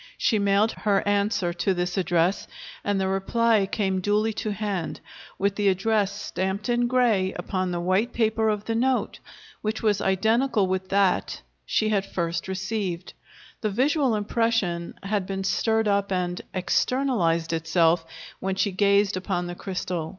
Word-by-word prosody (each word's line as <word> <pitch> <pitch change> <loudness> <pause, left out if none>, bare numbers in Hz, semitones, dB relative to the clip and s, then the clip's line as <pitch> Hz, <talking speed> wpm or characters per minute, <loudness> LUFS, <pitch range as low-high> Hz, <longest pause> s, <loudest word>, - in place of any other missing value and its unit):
She 220 - +2
mailed 200 +2 +3
her 205 -1 0
answer 205 -3 +1
to 190 +2 0
this 180 0 -2
address, 175 0 +1 0.4
and 205 -1 0
the 190 - 0
reply 205 +2 +2
came 190 -3 0
duly 210 +3 +1
to 215 +1 -3
hand, 200 -4 -3 0.4
with 200 0 0
the 205 -1 +1
address 200 +1 +2
stamped 190 +3 -3
in 240 0 +2
gray 230 -7 +2
upon 185 +1 -2
the 175 -1 -2
white 185 +7 +1
paper 220 -1 +1
of 210 -1 -2
the 225 - -1
note, 255 +3 0 0.4
which 215 +1 -3
was 210 -2 +2
identical 220 +3 +2
with 190 0 -2
that 195 -2 +1 0.3
she 215 - +1
had 200 -2 0
first 170 -1 -2
received. 190 -2 -3 0.5
The 215 - 0
visual 265 +3 +2
impression 210 -5 0
had 195 -1 -1
been 195 -1 -3
stirred 220 +3 +1
up 200 -1 +1
and 180 -1 -1
"externalized" 185 -4 +1
itself 165 +1 +2 0.4
when 190 0 -2
she 195 +1 +1
gazed 200 +1 +3
upon 185 -1 -2
the 175 - -5
crystal. 180 -3 -4
200 Hz, 155 wpm, -25 LUFS, 185-215 Hz, 0.5 s, mailed